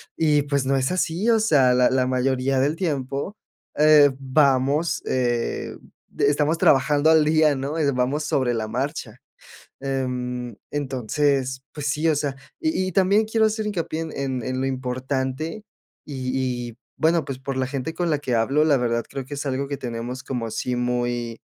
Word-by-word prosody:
y, 150 -2 +3
pues, 140 -2 -1
no 135 +1 +2
es 130 +2 0
así, 185 +3 0
o 225 -1 +4
sea, 140 -12 +4
la 125 0 +4
la 130 -1 +2
mayoría 130 +1 +1
del 145 +4 +1
tiempo, 145 +1 -2 0.4
eh, 150 -1 +7
vamos, 140 +3 +2
eh, 120 -2 -1 0.4
estamos 145 +3 +2
trabajando 145 +1 +4
al 160 -1 +5
día, 155 -1 +4
¿no?, 140 +4 -3
eh, 145 -3 +2
vamos 130 +4 0
sobre 130 -4 0
la 110 -2 -2
marcha, 125 -1 -4 0.6
em, 125 -3 -3 0.2
entonces, 135 -1 -1
pues, 145 -2 -4
sí, 150 +3 +1
o 155 - +2
sea, 145 -2 -2 0.2
y 315 - 0
y - - -3
también 195 +4 +3
quiero 220 0 +2
hacer 215 0 -1
hincapié 165 -5 -3
en 160 -1 -5
en 130 -4 -3
en 130 +1 -3
lo 135 - 0
importante 130 - -3 0.4
y 130 -3 -3
y 115 - -20 0.2
bueno, 165 0 +3
pues, 135 -2 -5
por 135 0 -4
la 130 -1 0
gente 135 +3 -4
con 175 0 -1
la 150 - +2
que 130 -4 -3
hablo, 135 +7 +2
la 150 -2 +4
verdad, 115 -2 -1
creo 135 - -5
que 145 +2 -7
es 145 - -5
algo 135 0 -2
que 140 0 -4
tenemos 120 +1 -5
como 125 -5 -3
así 120 +3 -2
muy, 120 -1 -2
135 Hz, 180 wpm, -23 LUFS, 130-150 Hz, 0.6 s, eh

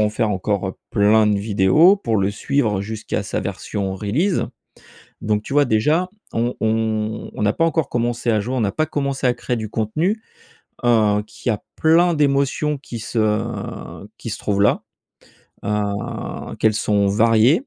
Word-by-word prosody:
en 105 - +3
faire 105 0 0
encore 95 0 -1 0.2
plein 105 +1 +4
de 105 -1 +2
vidéos, 105 - +5
pour 115 - -1
le 100 0 +1
suivre 110 -2 0
jusqu'à 110 +1 -3
sa - - -3
version 95 -2 -3
release. 125 - 0 0.8
Donc 105 0 0
tu 135 - -8
vois 145 -1 +4
déjà 150 +12 +2 0.2
on 120 +2 0
on 110 -1 -1
on - - -4
n'a 105 0 +3
pas 165 - +1
encore 160 -4 0
commencé 120 0 0
à 110 -2 +2
jouer, 125 +5 -3
on 125 - 0
n'a 100 - 0
pas 155 0 0
commencé 140 -3 -1
à 125 - +3
créer 120 0 -3
du 110 -1 -4
contenu, 155 - -1 0.6
heu, 105 -3 +3
qu'il 120 - -4
y - - +3
a 105 - -4
plein 170 +2 +4
d'émotions 145 0 +1
qui 120 -4 -8
se 110 -2 -2
qui 115 - -7
se - - -4
trouvent 100 -1 0
là. 105 - +3 0.8
Heu, 105 -1 -3
qu'elles 110 -1 +3
sont 100 -2 +1
variées 115 - +4
110 Hz, 170 wpm, -21 LUFS, 105-140 Hz, 0.8 s, vidéos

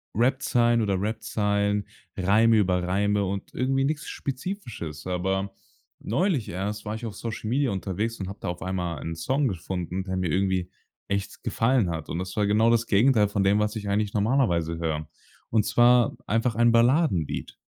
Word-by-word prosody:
Rapzeilen 120 0 +2
oder 100 -3 +1
Rapzeilen, 105 -1 0 0.3
Reime 110 +4 +4
über 90 -3 +2
Reime 100 +2 +1
und 100 +1 -4
irgendwie 135 +1 +1
nichts 150 +1 -2
Spezifisches. 130 - -5
Aber 95 +2 -1 0.5
neulich 150 - 0
erst 100 +4 -4
war 105 +1 -3
ich 115 +2 -6
auf 110 -3 -6
Social 110 0 -5
Media 135 +2 +1
unterwegs 100 +3 -3
und 95 - -4
habe 100 - -8
da - - -4
auf 85 0 -4
einmal 90 -3 -2
ein 80 +3 -5
Song 130 - 0
gefunden, 90 -2 -3
der 95 -1 -3
mir 90 -3 -1
irgendwie 95 0 0 0.4
echt 100 -1 -3
gefallen 115 -4 +2
hat. 80 -2 -5
Und - - -3
das 90 +1 -5
war 105 -1 +1
genau 110 +3 +4
das 115 0 +2
Gegenteil 110 0 +4
von 100 -1 0
dem, 100 +2 +3
was 105 +1 0
ich 105 -2 -5
eigentlich 105 0 0
normalerweise 100 - +1
höre. 80 -2 -2 0.4
Und 110 -2 +3
zwar 120 0 +4
einfach 115 +1 0
ein 120 +1 +4
Balladenlied. 115 - +2
105 Hz, 175 wpm, -26 LUFS, 95-115 Hz, 0.5 s, Reime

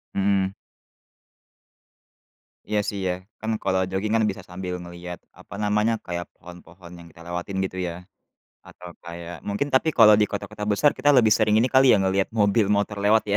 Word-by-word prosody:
Mmm. 95 -1 +1 2.1
Iya, 105 0 0
sih, 100 - -5
ya, 90 - 0 0.3
kan, 110 +1 -2
kalau 95 0 +1
joging, 95 +3 -2
kan, 110 - +2
bisa 95 - -6
sambil 90 0 -5
ngelihat, 85 0 -9 0.2
apa - - -11
namanya, 105 +2 +1
kayak 85 -1 -4
pohon-pohon 90 0 -14
yang 85 -1 -13
kita 85 - -17
lewatin, 90 +2 -4
gitu, 95 - -7
ya. 85 - -4 0.8
Atau 90 -1 -12
kayak 85 0 -8
mungkin 105 +8 -1
tapi 130 +4 +3
kalau 110 -3 +8
di 105 - +4
kota-kota 105 +1 -5
besar 125 +8 +3
kita 130 +3 -1
lebih 110 -4 +5
sering 110 -1 +2
ini 115 - +3
kali, 130 +1 +6
ya, - - +4
ngelihat 95 0 +1
mobil, 105 -1 +2
motor, 105 0 0
lewat, 110 +2 +4
ya, - - +4
100 Hz, 175 wpm, -24 LUFS, 90-105 Hz, 2.1 s, kalau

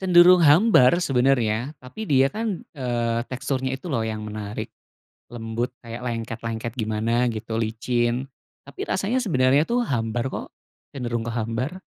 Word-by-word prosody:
cenderung 180 -1 +7
hambar 170 - +6
sebenarnya. 125 -2 +1
Tapi 215 +13 -7
dia 135 -1 +4
kan, 215 -4 -3
eee, 120 -4 -1
teksturnya 130 0 -2
itu 170 +6 -8
loh 115 -4 +1
yang 110 -1 -4
menarik, 105 -1 -5 0.6
lembut, 115 +1 -3
kayak 115 0 -8
lengket-lengket 115 -1 -4
gimana 115 +2 0
gitu, 110 +1 -4
licin. 120 +3 0 0.4
Tapi 140 - -12
rasanya 200 +7 0
sebenarnya 135 - +3
tuh 240 +1 +1
hambar 115 -1 -1
kok, - - -5 0.5
cenderung 120 -4 -3
ke 115 - -3
hambar. 115 +9 -2
125 Hz, 135 wpm, -24 LUFS, 115-140 Hz, 0.6 s, cenderung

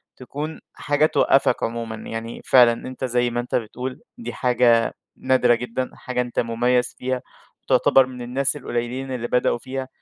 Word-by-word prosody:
تكون 145 +5 -6
حاجة 145 +1 +1
توقفك 135 -4 +3
عمومًا، 115 -1 -3
يعني 115 +1 -6
فعلًا 120 -3 +6
أنت 130 0 -4
زي 120 -1 +1
ما 120 0 -2
أنت 120 - -3
بتقول 125 +3 -4 0.2
دي 235 - -6
حاجة 120 -2 +3 0.2
نادرة 125 -2 +3
جدًا، 125 +2 -3
حاجة 125 -1 -3
أنت 125 -1 -3
مميّز 125 +1 +1
فيها 130 0 -2 0.4
وتعتبر 135 - +4
من 125 -1 -9
الناس 130 +3 -1
القليّلين 125 0 -3
اللي 120 -2 -3
بدأوا 125 -1 +1
فيها. 130 +2 -5
125 Hz, 155 wpm, -23 LUFS, 120-130 Hz, 0.4 s, فعلًا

